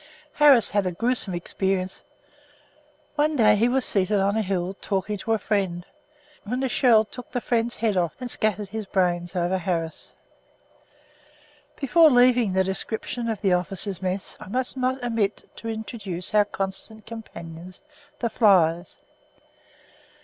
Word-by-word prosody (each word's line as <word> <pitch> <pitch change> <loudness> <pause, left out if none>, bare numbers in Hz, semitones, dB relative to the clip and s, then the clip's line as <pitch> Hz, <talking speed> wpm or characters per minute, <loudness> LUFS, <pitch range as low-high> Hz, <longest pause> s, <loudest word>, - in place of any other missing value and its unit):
Harris 280 -7 +6
had 205 -2 +1
a - - -1
gruesome 225 -1 -1
experience. 185 +1 -2 1.1
One 300 +1 +1
day 215 -5 +5
he 230 +4 +2
was 260 0 +1
seated 200 +1 +1
on 200 +2 +1
a 220 - +2
hill, 185 -2 -2
talking 195 +1 -2
to 225 - -1
a - - +2
friend, 190 -4 -1 0.6
when 250 +5 -3
a - - +2
shell 230 -2 +4
took 250 +3 -10
the 245 - -1
friend's 235 0 0
head 220 -2 0
off 170 -4 0
and 250 - -4
scattered 210 -3 -1
his 215 -1 -5
brains 175 -1 0
over 180 +1 0
Harris. 165 -2 -3 1.6
Before 315 +4 +5
leaving 245 -5 +4
the 190 0 +3
description 220 +5 -3
of 220 -3 -3
the 195 -3 +3
officers' 185 +1 -1
mess, 185 +1 -3
I - - -10
must 250 +6 -2
not 260 0 -1
omit 225 -4 -1
to 230 - -7
introduce 210 -4 -5
our 210 -1 +5
constant 200 +2 -5
companions, 180 -5 -10 0.4
the 235 - 0
flies. 175 -5 +3
210 Hz, 150 wpm, -24 LUFS, 185-235 Hz, 1.6 s, Harris